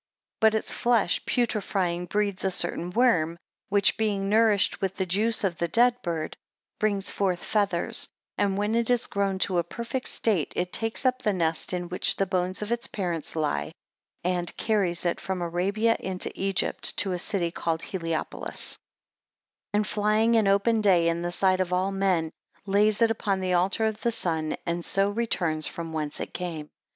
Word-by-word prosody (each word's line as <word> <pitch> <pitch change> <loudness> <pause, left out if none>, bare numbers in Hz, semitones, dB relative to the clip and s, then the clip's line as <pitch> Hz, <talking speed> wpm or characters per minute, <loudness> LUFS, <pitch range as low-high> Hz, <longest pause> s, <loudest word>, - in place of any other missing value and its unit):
3 220 - +7
But 220 - -3
its 220 - -1
flesh 235 -7 +1
putrefying, 190 -7 0
breeds 205 0 -1
a 190 - +2
certain 175 -1 0
worm, 180 -7 +2 0.3
which 200 0 +3
being 200 -3 0
nourished 215 -2 +3
with 195 -1 -1
the 190 - -1
juice 215 +6 +1
of 180 -4 -1
the 170 - +1
dead 245 +6 +3
bird 165 -5 -3 0.4
brings 205 -2 0
forth 185 -3 -1
feathers; 200 -5 +1 0.3
and 200 -1 0
when 210 +2 0
it 235 0 +1
is 245 -1 +2
grown 200 -1 -1
to 185 -1 +1
a - - +1
perfect 235 +8 -4
state, 195 -10 0
it 180 0 -2
takes 225 +4 0
up 255 0 +2
the 210 - +1
nest 165 -3 0
in 180 -1 -2
which 180 +1 +1
the 195 - +1
bones 185 +1 -1
of 210 - -5
its 235 0 0
parent 175 -7 -3
lie, 80 - -1 0.5
and 175 -1 -2
carries 190 -6 0
it 170 - 0
from 190 -1 -3
Arabia 195 +7 +1
into 185 -1 -2
Egypt, 195 0 -1
to 190 -1 +1
a 180 - -2
city 180 -3 -1
called 165 -1 -2
Heliopolis: 165 -4 -3 1.0
4 - - +3
And 210 - +2
flying 215 +2 +2
in 220 -3 +4
open 200 +3 +3
day 180 -5 +4
in 170 0 -1
the 175 - -2
sight 185 +1 +2
of 185 -1 -1
all 185 +2 +1
men, 185 -5 +1 0.3
lays 210 +3 +3
it 225 - +4
upon 200 -3 -1
the 185 -1 -1
altar 190 +5 +2
of 220 -1 -2
the 235 - +1
sun, 160 -8 -1
and 170 0 -2
so 195 +3 +3
returns 175 -9 -1
from 165 -1 -6
whence 150 -2 -3
it - - -5
came. 165 -4 -5
195 Hz, 185 wpm, -26 LUFS, 175-215 Hz, 1.0 s, 3